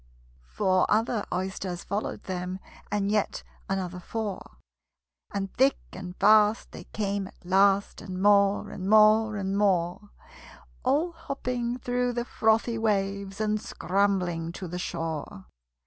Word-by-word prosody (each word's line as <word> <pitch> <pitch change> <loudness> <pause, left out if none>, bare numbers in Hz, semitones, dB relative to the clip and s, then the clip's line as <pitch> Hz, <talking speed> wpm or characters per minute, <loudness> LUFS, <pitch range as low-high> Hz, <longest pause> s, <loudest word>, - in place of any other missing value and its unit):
Four 185 -3 +2
other 220 0 +1
Oysters 185 -1 -3
followed 205 +3 -3
them, 180 0 -4 0.3
And 205 -1 0
yet 210 -1 0 0.3
another 185 -2 -2
four; 210 +2 -5 0.7
And 195 -1 -3
thick 270 +2 +3 0.2
and 180 -1 -7
fast 210 +2 +4
they - - -10
came 200 -2 -2
at 190 - -19
last, 195 +2 +3
And 185 -1 -6
more, 200 0 +3
and 190 0 -4
more, 215 0 +5
and 195 -1 -2
more 190 -1 +1 0.7
All 295 +7 +1
hopping 250 -7 -3
through 245 0 -1
the 240 0 -2
frothy 225 0 +1
waves, 200 -2 -1
And 215 -1 0
scrambling 185 -6 0
to 185 - -6
the 180 +1 -5
shore. 160 - -4
200 Hz, 130 wpm, -27 LUFS, 185-220 Hz, 0.7 s, more